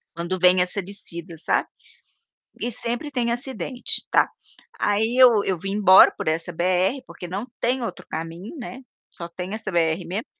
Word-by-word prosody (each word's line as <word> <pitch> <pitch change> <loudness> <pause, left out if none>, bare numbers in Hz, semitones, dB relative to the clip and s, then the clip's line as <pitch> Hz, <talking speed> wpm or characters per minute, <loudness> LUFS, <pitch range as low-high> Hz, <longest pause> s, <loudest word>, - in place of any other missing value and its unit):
Quando 170 +2 -2
vem 180 0 +5
essa 180 +2 0
descida, 170 -3 -8
sabe. - - 0 0.9
E 245 - -2
sempre 240 +6 -2
tem 240 -3 0
acidente, 250 +1 -3
tá. - - +5 0.5
Aí 220 +3 +1
eu 240 -5 +7
eu 185 -3 -1
vim 195 +3 -4
embora 195 -2 +7
por - - -5
essa 165 +3 0
BR, 185 +9 +1
porque 180 - -9
não 195 +5 -4 0.2
tem 250 +2 +1
outro 185 -6 -6
caminho, 165 - -6
né, 250 0 -7 0.3
só 170 - -8
tem 180 +3 -6
essa 220 -2 -4
BR 165 0 +1
mesmo, 190 +7 -4
195 Hz, 165 wpm, -23 LUFS, 175-235 Hz, 0.9 s, eu